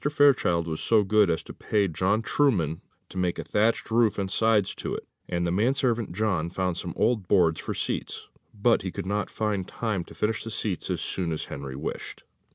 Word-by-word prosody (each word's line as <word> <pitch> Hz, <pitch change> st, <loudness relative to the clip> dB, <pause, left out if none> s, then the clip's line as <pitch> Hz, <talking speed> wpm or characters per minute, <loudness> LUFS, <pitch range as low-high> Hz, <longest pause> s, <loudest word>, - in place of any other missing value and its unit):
Fairchild 135 Hz, -, +3 dB
was 80 Hz, -1 st, -3 dB
so 110 Hz, -2 st, +4 dB
good 105 Hz, -1 st, +4 dB
as 80 Hz, -2 st, 0 dB
to -, -, -10 dB
pay 105 Hz, -2 st, 0 dB
John 95 Hz, +6 st, +1 dB
Trueman 90 Hz, -, +1 dB, 0.3 s
to 95 Hz, -, -5 dB
make 90 Hz, -1 st, 0 dB
a -, -, -4 dB
thatched 110 Hz, +2 st, +1 dB
roof 115 Hz, -2 st, +3 dB
and 95 Hz, -2 st, -2 dB
sides 110 Hz, -2 st, +3 dB
to -, -, -4 dB
it, -, -, -7 dB, 0.2 s
and 85 Hz, -1 st, 0 dB
the 85 Hz, -, 0 dB
man 110 Hz, +9 st, +2 dB
servant 120 Hz, -6 st, 0 dB
John 95 Hz, -4 st, 0 dB
found 90 Hz, 0 st, -1 dB
some 85 Hz, -1 st, -4 dB
old 110 Hz, -4 st, +1 dB
boards 85 Hz, -5 st, +3 dB
for -, -, -4 dB
seats; -, -, -3 dB, 0.2 s
but 115 Hz, +3 st, +2 dB
he 95 Hz, -, -4 dB
could -, -, -5 dB
not 100 Hz, +2 st, -1 dB
find 105 Hz, -4 st, -2 dB
time 105 Hz, -6 st, -2 dB
to -, -, -14 dB
finish 110 Hz, +1 st, -1 dB
the 115 Hz, -, -5 dB
seats 105 Hz, -5 st, -3 dB
as -, -, -1 dB
soon 90 Hz, -3 st, -2 dB
as 80 Hz, -, -3 dB
Henry 70 Hz, -1 st, -6 dB
wished. 70 Hz, +4 st, -6 dB
100 Hz, 210 wpm, -26 LUFS, 85-110 Hz, 0.3 s, so